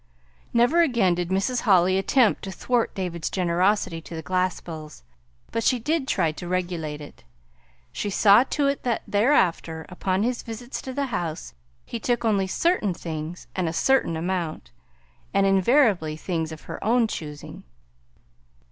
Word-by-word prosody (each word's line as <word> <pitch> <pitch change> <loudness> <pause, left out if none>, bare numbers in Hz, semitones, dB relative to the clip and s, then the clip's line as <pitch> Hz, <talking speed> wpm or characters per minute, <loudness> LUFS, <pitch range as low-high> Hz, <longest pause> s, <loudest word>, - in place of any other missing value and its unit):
Never 245 +9 +4
again 235 - +3
did 175 0 -2
Mrs. 200 +6 0
Holly 185 -4 +4
attempt 230 +3 +3
to 195 - -6
thwart 235 +5 -1
David's 175 -4 -3
generosity 180 -1 +1
to 165 - -9
the 160 - -6
Glaspells; 175 - -3 0.5
but 230 - -1
she 255 - +3
did 295 +4 -1
try 160 - +1
to 175 +3 -8
regulate 175 -4 -3
it. 145 - -12 0.7
She 205 - -3
saw 205 +3 +6
to 285 +1 0
it 280 0 0
that 240 -3 -1
thereafter, 185 - +1
upon 185 +2 -1
his 245 +1 -1
visits 235 +2 -7
to 260 - -6
the 280 +1 -1
house, 165 -3 -3 0.3
he 235 - -5
took 240 +1 -1
only 200 -4 +2
certain 215 - +1
things 160 +1 -6
and 180 -3 0
a - - -5
certain 265 -5 +2
amount, 165 - -3 0.6
and 195 0 +4
invariably 195 - +3
things 160 -2 -3
of 160 - -9
her - - -8
own 235 +2 +3
choosing. 150 -7 -7
190 Hz, 155 wpm, -25 LUFS, 170-235 Hz, 0.7 s, saw